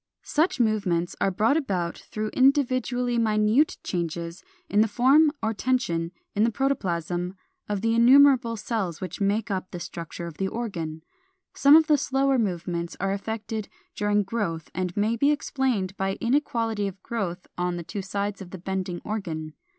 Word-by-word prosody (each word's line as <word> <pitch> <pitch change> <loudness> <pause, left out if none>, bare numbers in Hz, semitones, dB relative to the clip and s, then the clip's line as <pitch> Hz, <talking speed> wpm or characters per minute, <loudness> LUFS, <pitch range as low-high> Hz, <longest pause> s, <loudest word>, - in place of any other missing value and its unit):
Such 310 -1 +1
movements 200 -7 +1
are - - +3
brought 215 - +2
about 185 - -1
through 215 0 -5
individually 255 -2 +2
minute 215 +6 +3
changes 170 0 -4 0.2
in 205 - +3
the 220 - +4
form 270 +7 +5
or 220 0 +1
tension 200 -9 0 0.2
in 205 - +2
the 230 - +4
protoplasm 180 - -1 0.3
of 205 -2 -1
the 225 +1 +1
innumerable 250 0 +6
cells 205 -6 -3
which 185 +2 -6
make 205 +2 +1
up 185 -1 -2
the 175 - -6
structure 170 0 -7
of 170 -3 -8
the 195 - 0
organ. 170 -9 -4 0.5
Some 285 +2 +6
of 320 0 +7
the 300 -2 +3
slower 270 0 +2
movements 175 -4 -2
are 195 +1 0
effected 220 +1 -4 0.3
during 205 0 +2
growth, 190 -6 -3
and 180 +1 -3
may 215 +3 +2
be 280 +5 +3
explained 260 -10 0
by 195 0 0
inequality 230 -5 0
of 190 -1 -9
growth 190 -6 -3
on 180 0 -1
the 170 - -5
two 200 +4 -5
sides 200 +1 -3
of 185 - -8
the 190 - -7
bending 185 0 -3
organ. 160 -8 -4
205 Hz, 165 wpm, -26 LUFS, 180-240 Hz, 0.5 s, of